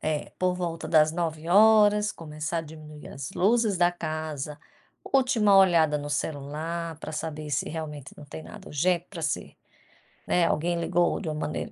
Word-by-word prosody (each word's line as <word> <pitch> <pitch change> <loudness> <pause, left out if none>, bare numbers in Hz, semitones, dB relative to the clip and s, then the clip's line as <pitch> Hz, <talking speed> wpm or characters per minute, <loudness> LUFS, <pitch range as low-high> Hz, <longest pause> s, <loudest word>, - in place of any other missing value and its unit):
É, 155 -1 -3
por 185 0 +1
volta 170 -2 -4
das 155 -1 +4
21h 205 +6 +4
começar 155 -2 -5
a - - 0
diminuir 155 -1 -11
as 130 -1 -7
luzes 215 0 +2
da 175 0 +3
casa, 155 -3 -5 0.5
última 250 -7 +3
olhada 165 -6 +5
no 145 0 -5
celular 155 +3 -4
para 155 - -7
saber 155 -1 -5
se 145 - -1
realmente 150 -3 -6
não 150 - -11
tem 155 +2 -9
nada 210 -2 -12
urgente 175 +4 0
para 170 -5 -8
se 160 - -3 0.7
né, 175 -1 +2
alguém 170 +2 0
ligou 175 0 +1
de - - -7
uma 155 - -3
maneira 150 0 -4
165 Hz, 165 wpm, -26 LUFS, 150-180 Hz, 0.7 s, olhada